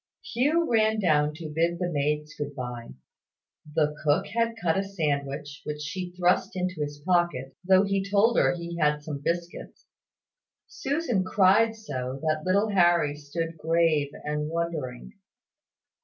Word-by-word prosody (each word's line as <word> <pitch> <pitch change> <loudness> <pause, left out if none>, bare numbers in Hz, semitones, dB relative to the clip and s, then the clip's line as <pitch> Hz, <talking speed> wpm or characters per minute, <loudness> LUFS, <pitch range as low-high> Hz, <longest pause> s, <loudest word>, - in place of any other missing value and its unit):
Hugh 300 +8 +2
ran 220 -1 +3
down 150 -5 +2
to 160 -1 -7
bid 170 +2 +1
the 180 - -1
maids 150 +1 -1
good 145 -1 -5
bye. 120 -3 -6 0.9
The 150 -1 +2
cook 155 +6 +2
had 230 0 0
cut 165 -4 +1
a 195 - +2
sandwich, 145 -6 -3
which 150 0 -5
she 180 +5 -5
thrust 180 +1 +2
into 180 -3 -2
his 145 0 -3
pocket, 175 -8 +1
though 190 +1 +5
he 195 -1 0
told 210 +4 +4
her - - +3
he 170 0 -6
had 150 -1 +2
some 145 -2 -5
biscuits. 170 +2 -4 0.8
Susan 275 - -1
cried 200 +4 +4
so 130 - -5
that 155 -1 0
little 200 +5 +2
Harry 175 -6 +3
stood 160 +3 -5
grave 160 -2 +2 0.2
and 150 0 -2
wondering. 155 - -4
165 Hz, 145 wpm, -27 LUFS, 150-190 Hz, 0.9 s, though